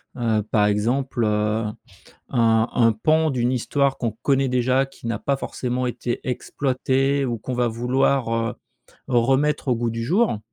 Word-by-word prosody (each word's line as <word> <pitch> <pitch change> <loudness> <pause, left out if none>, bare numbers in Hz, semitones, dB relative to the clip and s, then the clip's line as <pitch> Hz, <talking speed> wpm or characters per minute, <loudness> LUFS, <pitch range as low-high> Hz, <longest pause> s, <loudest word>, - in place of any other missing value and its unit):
heu, 115 -4 +1
par 105 -2 +3
exemple, 120 +4 0
heu, 105 +1 0 0.6
un 115 -1 +2
un 115 -2 +4
pan 155 +8 +2
d'une 125 -2 0
histoire 140 +2 0
qu'on 115 -3 -1
connaît 135 -1 +2
déjà, 125 +2 +2
qui 135 - -13
n'a 115 -3 -1
pas 140 -1 -1
forcément 125 -1 -3
été 120 0 -3
exploitée, 135 +2 0
ou 120 -3 -2
qu'on 125 +4 -5
va 120 -1 +1
vouloir, 125 +1 +1
heu, 115 0 -1 0.5
remettre 135 +4 +1
au 125 - +3
goût 115 0 -1
du 115 0 -4
jour. 185 - +1
125 Hz, 160 wpm, -23 LUFS, 115-135 Hz, 0.6 s, un